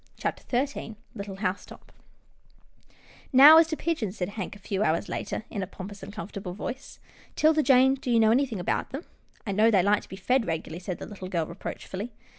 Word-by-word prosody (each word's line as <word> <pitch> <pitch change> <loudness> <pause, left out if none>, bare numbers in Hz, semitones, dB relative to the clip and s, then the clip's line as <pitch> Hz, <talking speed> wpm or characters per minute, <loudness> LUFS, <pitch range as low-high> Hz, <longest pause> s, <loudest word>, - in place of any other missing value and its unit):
CHAPTER 255 +2 -1
XIII 250 -6 -8 0.2
LITTLE 200 -3 -7
HOUSETOP 195 -1 -5 0.7
" - - -32 0.3
Now 295 +5 +10
as 325 - +5
to 315 -1 -3
pigeons," 230 - -2
said 180 - -2
Hank 205 -2 -6
a - - -11
few 200 0 -3
hours 165 -2 +1
later, 220 - -4
in 205 - -3
a 185 - -3
pompous 200 +1 -9
and - - -8
comfortable 195 -2 -7
voice, 260 +6 -6 0.2
" - - -26
'Tilda 310 0 +4
Jane, 265 -2 +5
do 265 -1 -5
you 235 -1 +4
know 220 -1 +5
anything 245 -4 +1
about 175 - -1
them? 275 +5 -6 0.2
" - - -34
I 200 - -2
know 215 +3 +4
they 195 -5 +4
like 205 +2 +3
to - - -17
be - - -7
fed 240 +5 +1
regularly," 160 +1 -4
said 180 -1 -5
the - - -7
little 190 -3 -8
girl, 170 -4 0
reproachfully. 195 +5 -7
210 Hz, 215 wpm, -27 LUFS, 190-255 Hz, 0.7 s, Now